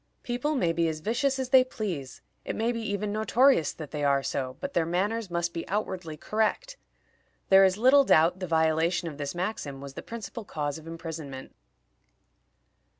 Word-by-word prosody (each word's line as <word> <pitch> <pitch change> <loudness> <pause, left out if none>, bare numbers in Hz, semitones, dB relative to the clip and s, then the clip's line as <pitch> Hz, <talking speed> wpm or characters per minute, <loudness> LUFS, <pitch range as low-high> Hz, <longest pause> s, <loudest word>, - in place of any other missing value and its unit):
People 250 +5 -1
may 175 -10 +1
be 165 0 +1
as 155 -1 -3
vicious 245 - 0
as 260 -1 -3
they 260 -1 +7
please; 185 - -5 0.2
it - - -4
may 230 +2 0
be 230 -1 -4
even 205 -1 -2
notorious 220 - +3
that 155 -3 -9
they 150 -1 -3
are 140 -1 +2
so, 130 -1 -3
but - - -5
their 170 - +2
manners 195 +6 -1
must 170 0 -1
be 165 - -5
outwardly 185 -5 -3
correct. 220 - -1 0.7
There 195 0 +8
is 190 0 +3
little 260 +5 +6
doubt 170 -5 +4
the 185 - -4
violation 160 +1 +1
of 150 -3 -7
this 145 +3 -4
maxim 175 -7 -3
was 140 0 -9
the - - -7
principal 230 0 -7
cause 150 -4 -4
of 160 - -14
imprisonment. 160 -5 -7
175 Hz, 180 wpm, -28 LUFS, 155-225 Hz, 0.7 s, There